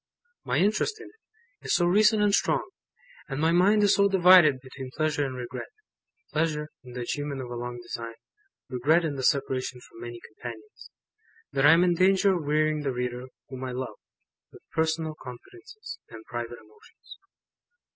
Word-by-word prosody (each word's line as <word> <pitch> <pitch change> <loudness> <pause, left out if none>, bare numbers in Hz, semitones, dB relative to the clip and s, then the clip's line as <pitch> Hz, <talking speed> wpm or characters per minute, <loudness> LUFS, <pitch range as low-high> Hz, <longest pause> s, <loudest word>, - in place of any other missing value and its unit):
My - - -1
interest 215 - +1
in - - -10
it, 455 +2 -29
is - - +3
so 175 - +3
recent 210 +4 +4
and 205 -1 +3
strong; - - +1 0.6
and 135 0 -3
my 160 +2 +3
mind 200 +5 +4
is 205 - +5
so 200 0 +4
divided 180 -7 +6
between 130 0 -9
pleasure 155 -2 +1
and 130 - -6
regret 125 0 -6 0.7
pleasure 155 -1 0
in 125 -1 -12
the 125 - -5
achievement 145 +3 -3
of 125 -2 -6
a - - -4
long 120 0 -5
design, 115 -1 -6 0.5
regret 150 +7 +2
in 155 - -1
the 135 - -4
separation 130 -1 0
from 115 - -15
many 120 0 -7
companions 110 -1 -11 0.6
that 135 +1 +3
I 150 - +9
am 170 +2 +5
in 180 -1 +3
danger 190 +2 +4
of 175 -4 -2
wearying 155 +1 +1
the 140 -2 -1
reader 125 0 -4 0.2
whom 130 0 -7
I 130 -1 -4
love, 130 +1 -5 0.5
with - - -16
personal 160 0 0
confidences, 365 - -10
and 110 -1 -11
private 120 +1 -5
emotions. 110 -1 -17
145 Hz, 175 wpm, -27 LUFS, 125-180 Hz, 0.7 s, I